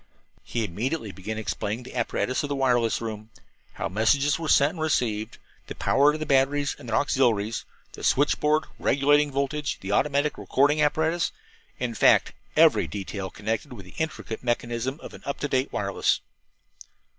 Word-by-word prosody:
He 115 -2 -3
immediately 110 - -3
began 95 +4 -6
explaining 110 +2 -3
the - - -11
apparatus 125 +1 -1
of 145 - -4
the 140 - -1
wireless 120 -5 +2
room 110 -1 -6 0.4
how - - -3
messages 140 - +2
were 165 - -4
sent 140 +1 +5
and 170 - -10
received; 115 -8 0 0.3
the - - -7
power 145 +2 +4
of 155 - -4
the 155 - -3
batteries 140 +1 +2
and 120 - -9
their - - 0
auxiliaries; 115 -6 +1 0.3
the - - -10
switch 145 +2 +2
board 155 +1 +2 0.2
regulating 145 +2 +3
voltage; 140 +2 -2
the 95 - -4
automatic 145 +6 +1
recording 145 +3 +2
apparatus 160 +1 +1 0.5
in 125 -2 -2
fact, - - +4 0.2
every - - +5
detail 100 -1 -5
connected 110 +8 -4
with 100 -6 -10
the 90 - -14
intricate 155 -8 -4
mechanism 120 +3 -2
of - - -9
an - - -11
up 140 - -4
to 145 - 0
date 130 0 0
wireless. 100 -1 0
130 Hz, 170 wpm, -26 LUFS, 110-145 Hz, 0.5 s, sent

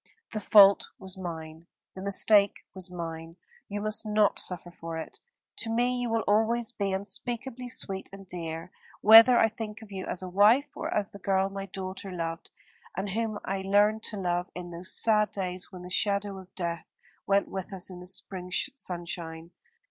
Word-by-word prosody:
The 215 - -3
fault 200 -1 +6
was 190 -1 -4
mine, 165 -3 -7 0.3
the 190 - -8
mistake 200 +1 +4
was 190 -1 -3
mine. 165 -2 -6 0.3
You 205 0 -3
must 215 +1 +1
not 210 -1 +2
suffer 175 -1 -4
for 165 -1 -7
it. 160 - -7 0.4
To 225 - -4
me 245 +2 +1
you 245 - -1
will 225 0 +1
always 225 +3 +2
be 200 -4 -2
unspeakably 240 +6 -3
sweet 190 -4 -2
and 195 0 -11
dear 165 -1 -6 0.3
whether 225 +3 +9
I 225 - +5
think 220 -1 -7
of 210 - -14
you 190 -1 -5
as 185 - -3
a - - -4
wife, 215 +10 +4
or - - -4
as 205 -2 -1
the 200 - -11
girl 195 0 +1
my 195 0 -5
daughter 190 0 -6
loved 165 -2 -4 0.5
and 195 +1 -2
whom 220 0 -2
I 195 0 -2
learned 205 +3 +3
to 215 - -3
love 180 -1 -1
in 175 0 -7
those 170 +2 -2
sad 210 -2 +3
days 185 -1 -5
when 180 -2 -9
the 180 - -8
shadow 200 0 0
of 190 0 -15
death 170 -2 -3 0.4
went 200 0 +3
with 190 0 -5
us 190 -1 -3
in 180 - -9
the 180 - -9
spring 185 -1 -4 0.2
sunshine. 170 -6 -5
195 Hz, 185 wpm, -28 LUFS, 180-215 Hz, 0.5 s, whether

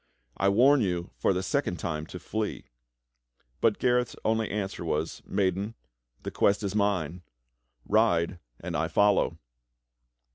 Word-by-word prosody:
I 100 - +2
warn 130 +7 +5
you 90 -3 -1
for - - +3
the 95 0 -1
second 95 -3 -1
time 80 -2 -4
to - - -8
flee." 110 +3 -4 0.9
But 110 -2 +3
Gareth's 125 -1 +1
only 110 -1 +1
answer 100 -3 -3
was: 80 -1 -2
"Maiden, 100 +3 0 0.5
the - - -4
quest 100 +1 +2
is 100 -1 -2
mine. 90 -5 0 0.6
Ride 90 -5 +2 0.2
and - - -5
I - - +1
follow." 100 0 +3
100 Hz, 135 wpm, -28 LUFS, 90-110 Hz, 0.9 s, warn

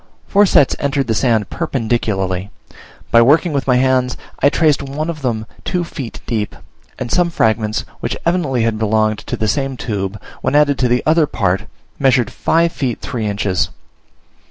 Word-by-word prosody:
Four 205 0 +4
sets 145 -6 +4
entered 140 -1 0
the 115 - 0
sand 110 -3 +1
perpendicularly: 100 -6 -1 0.6
by 115 - +7
working 150 +7 +4
with 140 -1 -1
my 125 - +4
hands 130 0 +2 0.2
I 140 - +5
traced 150 -2 +2
one 145 +4 -3
of 155 -3 -9
them 115 -4 -2 0.2
two 180 -2 -1
feet 140 -7 -7
deep; 110 -3 -2 0.4
and 125 -2 -5
some 175 -1 +3
fragments 110 -7 0
which - - -3
evidently 155 -9 +1
had 115 -1 0
belonged 110 0 +1
to - - -5
the 110 - -1
same 135 +4 -1
tube, 100 -3 -3 0.2
when - - 0
added 145 -2 +4
to 125 - +3
the 125 +1 +1
other 155 0 +4
part, 95 -6 0 0.3
measured 130 -4 +3
five 165 +1 +1
feet 130 -7 -2
three 115 -4 -3
inches. 100 -3 0
125 Hz, 170 wpm, -17 LUFS, 110-145 Hz, 0.6 s, by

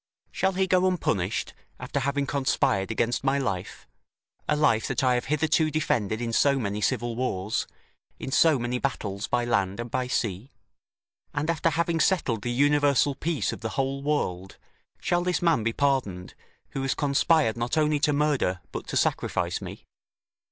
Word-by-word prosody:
Shall 190 0 0
he 190 +1 +1
go 185 0 +3
unpunished, 105 - -1 0.3
after - - -3
having 140 +2 0
conspired 130 -8 0
against 115 +2 0
my 135 +1 +2
life, 100 -10 -3 0.6
a 150 - +3
life 140 -7 +2
that 135 0 -1
I 130 -1 +4
have 120 - -1
hitherto 155 +2 +2
defended 110 -9 0
in 115 -1 -3
so 140 +3 +3
many 105 -4 -2
civil 115 +3 0
wars, 110 -5 -2 0.5
in 135 - -6
so 155 +1 +5
many 120 0 -2
battles 105 -7 -3
by 120 0 0
land 100 -3 0
and 120 0 -5
by 130 0 -1
sea? 115 -2 -2 0.9
And 150 +3 0
after 165 0 +1
having 165 +1 0
settled 145 - +1
the 120 - -3
universal 145 +1 +3
peace 155 +2 -2
of - - -9
the 110 - -3
whole 135 0 -1
world, 95 -11 -2 0.4
shall 175 0 +1
this 180 -1 0
man 165 -8 +3
be 115 - +1
pardoned, 115 -10 -1 0.4
who 135 - -4
has 135 0 0
conspired 145 -3 +2
not 120 +6 -2
only 150 -1 +2
to 150 - +2
murder, 145 -11 +1
but - - -6
to - - -2
sacrifice - - 0
me?" - - -9
135 Hz, 170 wpm, -26 LUFS, 115-150 Hz, 0.9 s, so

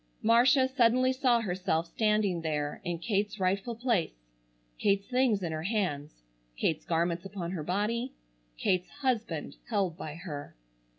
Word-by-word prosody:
Marcia 250 +4 +5
suddenly 255 0 +3
saw 250 -3 +3
herself 180 -4 0
standing 210 -2 +1
there 150 -2 -2
in 175 -1 -2
Kate's 205 +3 -1
rightful 195 +5 0
place, 215 - -1 0.5
Kate's 200 0 +2
things 250 -6 +2
in 170 - -2
her 155 0 -3
hands, 160 - -2 0.3
Kate's 155 - 0
garments 170 +1 0
upon 190 -3 -5
her 180 -4 -3
body, 210 - -1 0.5
Kate's 180 - +1
husband 240 - -2
held 195 -7 0
by 155 -3 -6
her. 150 -4 -7
195 Hz, 135 wpm, -30 LUFS, 170-235 Hz, 0.5 s, Marcia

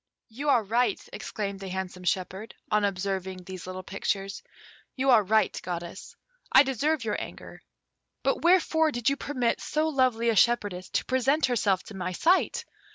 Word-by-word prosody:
"You 275 +7 -3
are 240 -5 +4
right," 235 +4 +1
exclaimed 205 -2 -4
the 195 - -7
handsome 185 -1 -5
shepherd, 190 +4 -2 0.2
on 210 0 +3
observing 190 -1 -2
these 185 0 -8
little 185 0 -6
pictures; 195 +1 -3 0.5
"you 265 0 +2
are 230 -3 +7
right, 215 +3 +2
Goddess. 175 +1 -6 0.4
I 270 - +8
deserve 280 +2 0
your 210 -2 -2
anger; - - -9 0.6
but - - +1
wherefore 335 -3 +4
did 240 0 +1
you - - +1
permit 255 -5 -1
so 310 +1 0
lovely 255 -5 +2
a 225 - +2
shepherdess 205 -5 +2
to - - -1
present 270 +4 +2
herself 205 -7 +1
to - - -11
my 185 -1 -4
sight? 350 - +2
215 Hz, 160 wpm, -27 LUFS, 190-260 Hz, 0.6 s, I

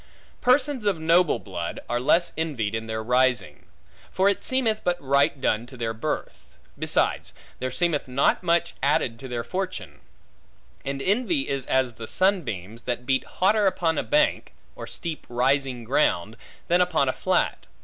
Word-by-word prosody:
Persons 260 -1 +2
of 200 -4 +2
noble 165 +1 +3
blood, 85 -4 -5
are 120 - 0
less 170 +7 +2
envied 135 -10 -2
in 110 0 -3
their 110 0 -3
rising. 125 -2 +1 0.4
For 190 +1 +3
it 200 - -1
seemeth 235 -5 +1
but 175 0 0
right 140 0 +2
done 115 -2 0
to 130 - -12
their 115 -1 -2
birth. 110 - -5 0.2
Besides, - - 0 0.2
there 130 - -2
seemeth 155 +2 0
not 130 +2 +2
much 170 -1 +1
added 125 -4 +1
to 130 - -8
their 120 -2 -3
fortune; 185 +4 -5 0.8
and 135 0 -3
envy 255 - +1
is 135 -1 -3
as 130 -2 +1
the 110 0 -8
sunbeams, 115 - -1
that 125 0 -2
beat 130 0 +1
hotter 205 +2 +2
upon 165 -4 +1
a - - +2
bank, 300 +1 +1 0.2
or - - -8
steep 165 -3 -5
rising 130 0 +1
ground, 110 - +1 0.3
than 175 +1 +4
upon 165 -6 +2
a 130 - +1
flat. - - 0
140 Hz, 160 wpm, -25 LUFS, 120-180 Hz, 0.8 s, than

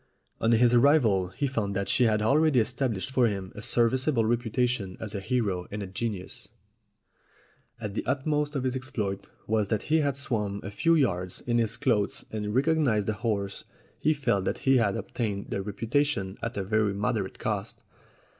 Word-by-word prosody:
On 115 - +2
his 120 +1 +4
arrival 120 -8 +4
he 125 +11 -3
found 110 -7 -2
that 100 0 -1
she 125 - +3
had 110 -1 +2
already 145 +3 +4
estab 120 +1 0
lished 95 +7 -5
for 130 -2 +3
him 95 -3 -4
a 105 - -8
serviceable 120 +2 +2
reputation 120 -3 0
as 110 -2 -6
a 100 - -2
hero 100 -5 -1
and 105 0 -4
a - - -4
genius. 100 0 -5 1.3
As 105 -3 -4
the - - -2
utmost 150 +1 0
of 135 - -1
his 130 0 0
exploit 105 -7 -3 0.2
was 110 -2 +1
that 110 0 -1
he 160 - +5
had 140 -3 0
swum 105 -8 -2
a 100 - -6
few 165 +10 +3
yards 90 - 0
in 120 -1 0
his 115 -1 +2
clothes 105 -6 0
and 105 0 -3
recognized 135 -8 +2
a - - +1
horse, 105 -3 -2 0.4
he 155 - +2
felt 120 -10 0
that - - -1
he 135 -1 +5
had 100 -5 +2
obtained 105 -4 -4
the 100 - -1
reputation 105 0 -1
at 115 -1 -4
a 100 - -1
very 105 0 +1
moderate 105 -1 -1
cost. 105 -1 -4
110 Hz, 185 wpm, -27 LUFS, 100-130 Hz, 1.3 s, he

